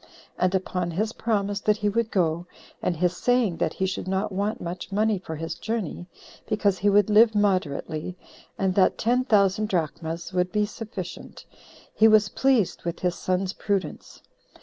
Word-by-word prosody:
And 185 +1 +2
upon 180 -2 -1
his 215 +7 -2
promise 205 -3 -1
that 210 +1 +1
he 210 -1 -1
would 225 +2 0
go, 170 -3 0 0.3
and 175 - -1
his 180 +2 +1
saying 240 -6 +1
that - - -1
he 190 - -1
should 190 0 -3
not 190 +2 -1
want 205 +3 -2
much 175 +2 -6
money 210 0 +1
for 160 -3 -7
his 165 +1 -4
journey, 215 -6 -4 0.4
because 205 -3 +1
he 205 - +3
would 205 -1 +4
live 220 +1 +6
moderately, 180 -4 -1 0.4
and 190 -1 +1
that 185 0 +3
ten 245 +3 +2
thousand 210 -2 +3
drachmas 165 0 -3
would 180 0 0
be 210 -1 +1
sufficient, 205 -4 -8 0.5
he 220 - +5
was 215 -2 +5
pleased 260 -8 +1
with 170 0 -4
his 180 -1 +1
son's 185 +1 -1
prudence. 195 -8 -4
195 Hz, 170 wpm, -25 LUFS, 180-215 Hz, 0.5 s, live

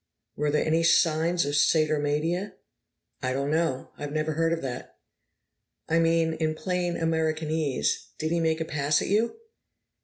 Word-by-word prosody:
"Were 150 0 0
there 150 +1 +1
any 160 +1 +2
signs 165 +1 +3
of 145 - -2
Satyromania?" 155 +5 +1 0.7
"I 130 0 -1
don't 140 +2 -1
know. 155 -5 -1
I 145 - -4
never 155 +2 -1
heard 165 +1 +1
of 165 -2 -2
that." 125 -2 -6 0.9
"I 165 +1 +2
mean, 165 0 +2
in 155 -1 -1
plain 180 0 -2
Americanese, 160 -3 -1
did 155 +1 -2
he 170 - +1
make 160 -1 +1
a 160 - -2
pass 145 -1 +1
at - - -4
you?" 220 - +1
160 Hz, 155 wpm, -26 LUFS, 150-165 Hz, 0.9 s, signs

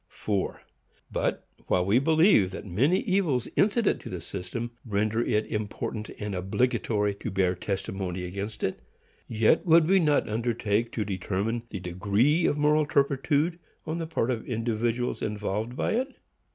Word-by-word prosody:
4. 100 -3 -3 0.5
But, - - -1 0.2
while 90 0 +2
we 105 +6 +4
believe 160 - +4
that 95 - -8
many 130 - +2
evils 185 - +1
incident 215 +2 +2
to - - -8
the 90 - -5
system 95 +8 -5
render 110 +1 0
it 110 -2 +1
important 105 0 -4
and 105 -1 -3
obligatory 105 +2 0
to 100 - -6
bear 95 -1 +1
testimony 95 -1 -3
against 100 +4 -5
it, 95 - -1 0.5
yet 115 +6 +3
would 165 -1 +6
we 190 +2 +5
not 150 -4 +2
undertake 115 0 0
to 110 - -1
determine 100 +4 -2
the 100 - -5
degree 100 - +2
of 145 - +1
moral 150 0 +3
turpitude 145 +4 +1 0.3
on 160 +1 -3
the 165 - -3
part 145 -6 0
of 115 -3 -2
individuals 115 +1 -1
involved 105 +2 -2
by - - 0
it. 260 +4 -1
115 Hz, 150 wpm, -27 LUFS, 100-145 Hz, 0.5 s, would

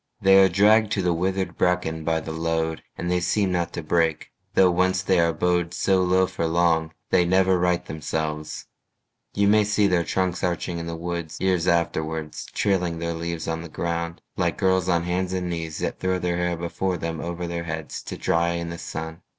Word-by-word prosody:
They 95 0 +6
are 95 - +5
dragged 105 +3 +4
to 100 - 0
the 90 -1 +2
withered 95 +3 -2
bracken 90 -3 +1
by 80 0 0
the 80 - -6
load, 80 0 -1 0.2
And 85 - -2
they 90 - +2
seem 95 +2 +1
not 85 -1 -1
to 85 - -4
break; 80 0 0 0.2
though 95 -1 +6
once 95 +1 +1
they 95 -2 +3
are 85 0 +3
bowed 85 +1 0
So 95 -1 +2
low 95 +1 +3
for 85 -2 -2
long, 80 -1 +2 0.2
they 90 - +5
never 95 +1 +3
right 90 0 +1
themselves: 75 -1 -4 0.7
You 100 0 +3
may 105 +1 +5
see 105 0 +2
their 90 -3 +2
trunks 90 +1 -1
arching 85 -1 -1
in 85 - -5
the 85 - -4
woods 85 -1 -4
Years 90 -2 +1
afterwards, 80 -2 -1
trailing 90 -4 0
their 85 0 -2
leaves 85 0 -4
on 80 0 -2
the 85 - -8
ground 85 +1 -3
Like - - 0
girls 95 -1 +2
on 85 -1 +2
hands 90 +1 -1
and 90 -1 -2
knees 80 -2 -4
that - - -3
throw 95 0 0
their 90 -1 -1
hair 90 -1 0
Before 90 +2 -2
them 80 -1 -4
over 85 +1 -4
their 85 0 -4
heads 80 -2 -5
to - - -6
dry 85 +1 +1
in 85 0 -3
the 85 - -7
sun. 80 +1 -6
85 Hz, 205 wpm, -24 LUFS, 80-95 Hz, 0.7 s, They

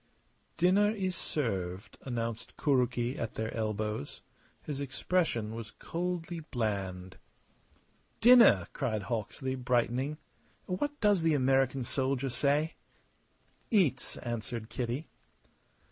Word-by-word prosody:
"Dinner 195 +4 +4
is 190 -4 -1
served," 95 - -2
announced 115 -3 -4
Kuroki 125 -3 +1
at 115 - -3
their 110 0 -3
elbows. 110 -6 -3 0.4
His 145 -2 -4
expression 130 -5 0
was 115 -1 -6
coldly 175 +2 -4
bland. 100 - -3 1.0
"Dinner!" 235 - +8
cried 110 -7 -1
Hawksley, 120 +4 -3
brightening. 125 +3 0 0.5
"What 290 +11 -2
does 205 -4 +4
the 160 -2 +3
American 135 -1 +2
soldier 135 +2 0
say?" 145 +5 +1 1.0
"Eats!" 165 - +2
answered 115 -1 -4
Kitty. 125 +5 -3
130 Hz, 100 wpm, -31 LUFS, 115-160 Hz, 1.0 s, Dinner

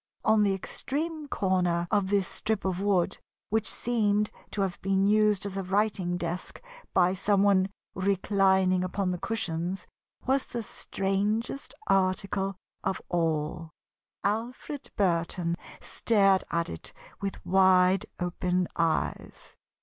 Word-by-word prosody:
On 220 -1 +5
the 200 -2 +3
extreme 305 - -4
corner 180 -6 +1
of 200 -3 +2
this 200 -3 +2
strip 215 -2 -2
of 185 0 -1
wood, 195 -4 +1 0.3
which 220 0 +1
seemed 210 -3 +1 0.2
to 205 - -3
have 190 -2 -2
been 195 0 +2
used 210 -1 +3
as 200 -1 -4
a 195 - -1
writing 190 -2 0
desk 175 +1 -4 0.3
by 180 0 +4
some 195 +1 +2
one 195 -1 +4 0.2
reclining 190 -1 +2
upon 185 0 -1
the 180 - -3
cushions, 180 -3 -2 0.4
was 265 +1 +2
the 235 -1 -4
strangest 205 +7 -2
article 195 +1 +1 0.3
of 190 - -1
all. 165 -1 -1 0.5
Alfred 240 +7 -3
Burton 170 -3 +1 0.3
stared 195 -4 +3
at 170 0 0
it 80 - -7 0.3
with 195 -1 -4
wide 185 0 +4
open 180 0 0
eyes. 165 -1 -2
195 Hz, 125 wpm, -28 LUFS, 180-205 Hz, 0.5 s, On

